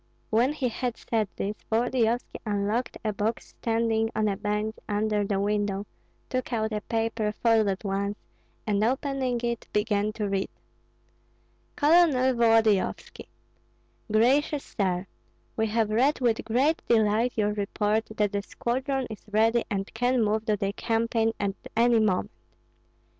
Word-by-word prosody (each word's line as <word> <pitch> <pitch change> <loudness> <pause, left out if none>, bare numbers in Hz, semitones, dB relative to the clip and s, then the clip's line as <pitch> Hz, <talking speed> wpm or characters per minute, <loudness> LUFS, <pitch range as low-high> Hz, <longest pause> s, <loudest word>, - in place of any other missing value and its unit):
When 240 +6 +3
he 280 -4 -1
had 245 0 -3
said 220 -3 -1
this, 205 +2 -3 0.2
Volodyovski 240 +1 0
unlocked 210 +3 -1
a 215 - 0
box 215 +3 -2
standing 225 -1 0
on 215 0 +1
a 200 - 0
bench 210 +2 -2
under 210 0 +1
the 200 -1 -1
window, 205 0 0 0.4
took 255 0 -3
out 220 -2 -1
a 210 - -2
paper 225 -1 -1
folded 220 -3 +1
once, 200 +1 -2 0.5
and 210 -1 +1
opening 260 0 0
it 235 -1 -2
began 210 0 +1
to 210 -1 -2
read: 195 -1 -1 1.3
Colonel 290 -5 +4
Volodyovski: 225 -4 +2 0.8
Gracious 275 +6 +3
Sir, 185 -2 0 0.5
We 220 0 +1
have 220 0 0
read 260 +7 +2
with 235 -3 +1
great 270 +8 +2
delight 225 +1 +3
your 210 -1 +1
report 210 +1 0
that 210 -1 +2
the 200 - -1
squadron 260 +5 -2
is 215 -2 -9
ready 225 +2 +3
and 195 -2 -3
can 245 +1 +2
move 215 +1 0
to 210 -1 +2
the 200 0 -2
campaign 225 0 0
at 200 -1 0 0.2
any 235 0 +5
moment. 205 -4 +1
220 Hz, 140 wpm, -27 LUFS, 210-240 Hz, 1.3 s, any